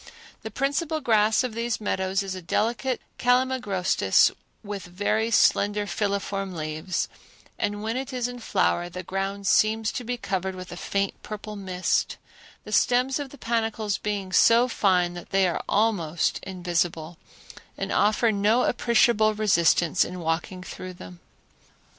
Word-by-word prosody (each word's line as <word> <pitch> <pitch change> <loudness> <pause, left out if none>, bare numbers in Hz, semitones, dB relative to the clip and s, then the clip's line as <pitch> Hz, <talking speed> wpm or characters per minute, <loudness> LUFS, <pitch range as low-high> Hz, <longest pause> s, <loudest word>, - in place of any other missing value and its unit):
The - - -6
principal 310 +3 -1
grass 220 -2 +3
of 250 -3 -3
these 230 0 -2
meadows 190 -2 -1
is 195 -1 -4
a 185 - -6
delicate 235 +8 -1 0.2
calamagrostis 245 - +2 0.3
with 205 -1 -5
very 205 +5 -1
slender 205 -2 +3
filiform 200 -1 -2
leaves, 155 +3 -3 0.5
and 205 0 -2
when 225 +2 -2
it 260 0 -4
is 250 -2 -1
in 245 0 -7
flower 175 -6 0
the 180 +1 -7
ground 195 +2 -3
seems 215 +3 +3
to 250 - -5
be 245 +1 -3
covered 190 -4 -3
with 185 0 -9
a - - -6
faint 200 +2 -2
purple 215 0 -7
mist, 185 -2 -1 0.5
the - - -10
stems 250 +3 +2
of 285 -2 -5
the 285 - -13
panicles 225 -4 -1
being 200 -3 -3
so 230 +5 +5
fine 180 -6 +2
that 175 -1 -9
they 195 -1 +3
are 175 - -2
almost 180 -7 +1
invisible, 175 -3 -2 0.6
and - - -3
offer 215 +2 +3
no 215 +4 +2
appreciable 235 -2 +3
resistance 175 -5 +3
in 180 0 -6
walking 170 +2 -2
through 185 0 -8
them. 90 - -12
205 Hz, 145 wpm, -25 LUFS, 185-230 Hz, 0.6 s, so